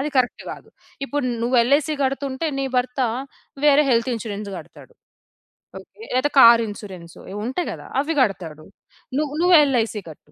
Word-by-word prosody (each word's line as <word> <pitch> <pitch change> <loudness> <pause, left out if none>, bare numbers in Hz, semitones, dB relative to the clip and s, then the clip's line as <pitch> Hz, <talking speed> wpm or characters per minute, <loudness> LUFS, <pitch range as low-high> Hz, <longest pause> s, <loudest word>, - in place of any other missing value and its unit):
అది 295 +2 -2
కరెక్ట్ 250 -1 0
గాదు. - - -10 0.4
ఇప్పుడు 285 -2 -2 0.2
నువ్వు 245 +1 +1
ఎల్‌ఐసీ 285 +5 +2
కడుతుంటే, 270 +2 -2
నీ 275 - -1
భర్త 250 +1 -1 0.6
వేరే 295 0 +6
హెల్త్ 235 +2 +2
ఇన్‌సూరెన్స్ 210 -2 -6
గడతాడు, - - -13 0.9
ఓకే. - - -18
లేతే 260 +4 +1
కారు 230 -2 +8
ఇన్‌సూరెన్సు. 190 -5 -10
ఇవుంటాయి 245 - -3
గదా! - - -9
అవి 315 +2 -3
గడతాడు. 165 -9 -2 0.5
నువ్ 300 -2 -2
నువ్వు 355 0 +5
ఎల్‌ఐసీ 230 -5 0
కట్టు. 150 -1 -15
250 Hz, 145 wpm, -22 LUFS, 210-280 Hz, 0.9 s, కారు